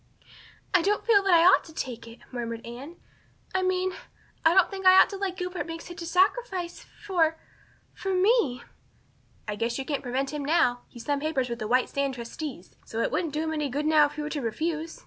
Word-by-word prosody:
"I 365 - +5
don't 410 +4 0
feel 430 -4 +5
that 390 -2 +2
I 335 0 +6
ought 370 - +6
to 320 - -13
take 240 -5 -5
it," 230 +1 -13
murmured 230 -2 -5
Anne. 255 +8 -9 0.6
"I 375 - +1
mean 370 0 0 0.5
I 325 +1 +5
don't 380 -2 +5
think 385 -1 -6
I 370 0 +9
ought - - +5
to 395 - -5
let 380 -2 -3
Gilbert 360 -1 -4
make 330 0 -6
such 350 -1 -9
a 335 - -5
sacrifice 370 -1 0 0.2
for 325 -5 +2 0.6
for 385 - -4
me." 370 - +2 0.8
"I 210 - -2
guess 230 +3 -2
you 270 - -4
can't 285 -1 -2
prevent 270 +3 -2
him 295 -1 -3
now. 275 -5 +2
He's 240 - -12
signed 285 -1 0
papers 280 -5 -1
with 235 0 -4
the 215 - -3
White 250 +3 +2
Sands 280 -1 -2
trustees. 240 - -7
So 225 - -6
it - - 0
wouldn't 320 +1 -1
do 305 +1 -1
him 320 0 -2
any 300 -2 -1
good 290 +4 -2
now 305 -1 +5
if 290 - -13
you 300 - -3
were 300 - -5
to 295 - -2
refuse. 315 +7 -3
310 Hz, 225 wpm, -27 LUFS, 255-365 Hz, 0.8 s, I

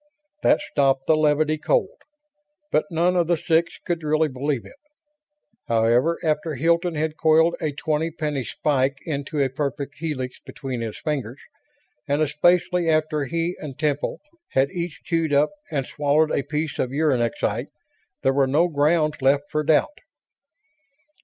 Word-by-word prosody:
That - - +4
stopped 135 -2 +1
the 160 - +4
levity, 155 0 +2
cold, - - 0 0.7
but 150 - +2
none 175 +2 +1
of 175 -2 +2
the 175 - +3
six 165 +1 +1
could 170 -2 -1
really 155 0 +1
believe 135 -1 -2
it. - - -13 0.9
However, 120 +8 +2
after 155 0 0
Hilton 170 +4 +1
had 155 +1 -2
coiled 160 +1 +4
a 155 -2 0
twenty 155 +2 -1
penny 150 -4 -3
spike 135 +3 0
into 145 -1 -3
a 140 - +3
perfect 140 0 -3
helix 140 -6 -4
between 135 -6 -6
his 110 -2 -5
fingers, 135 -4 -3 0.7
and 145 +1 +1
especially 175 +3 +2
after 155 -2 +1
he 170 +5 -2
and 140 -4 -8
Temple 150 -2 -1 0.3
had 135 +1 +2
each 170 -5 -5
chewed 165 -3 0
up 145 +4 +3 0.2
and 140 -5 -1
swallowed 150 +3 +1
a - - +1
piece 150 +2 -3
of 130 - 0
uranexite, 135 -5 0 0.6
there 135 - +3
were 135 -1 +3
no 160 +6 +3
grounds 155 0 +1
left 140 +2 +2
for 150 0 0
doubt. 155 - +2
150 Hz, 150 wpm, -23 LUFS, 140-160 Hz, 0.9 s, That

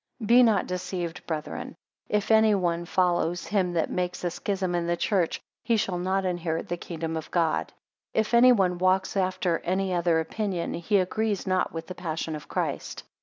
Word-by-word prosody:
9 220 - -5
Be 240 +4 +7
not 220 -6 +4
deceived 180 -2 -4
brethren; 155 -2 -4 0.3
if 210 +1 0
any 220 -1 +5
one 175 -2 0
follows 175 -1 +1
him 190 -4 0
that 165 -2 0
makes 180 0 -2
a 175 - 0
schism 190 0 -2
in 170 -1 0
the 175 0 0
church, 185 -3 0 0.2
he 230 -2 +2
shall 185 -4 -1
not 190 +2 0
inherit 175 -3 -2
the 175 - 0
kingdom 165 -1 -5
of 160 - -5
God. 160 - 0 0.4
If 220 +1 0
any 245 +2 +7
one 185 -6 +2
walks 185 +1 +2
after 185 -2 0
any 190 +1 -1
other 170 -2 +2
opinion, 180 +1 -2
he 200 +5 +1
agrees 205 +2 0
not 185 -1 +1
with 165 0 -6
the 185 - -7
passion 160 -2 -4
of 150 - -9
Christ. - - -3
180 Hz, 185 wpm, -27 LUFS, 170-195 Hz, 0.4 s, Be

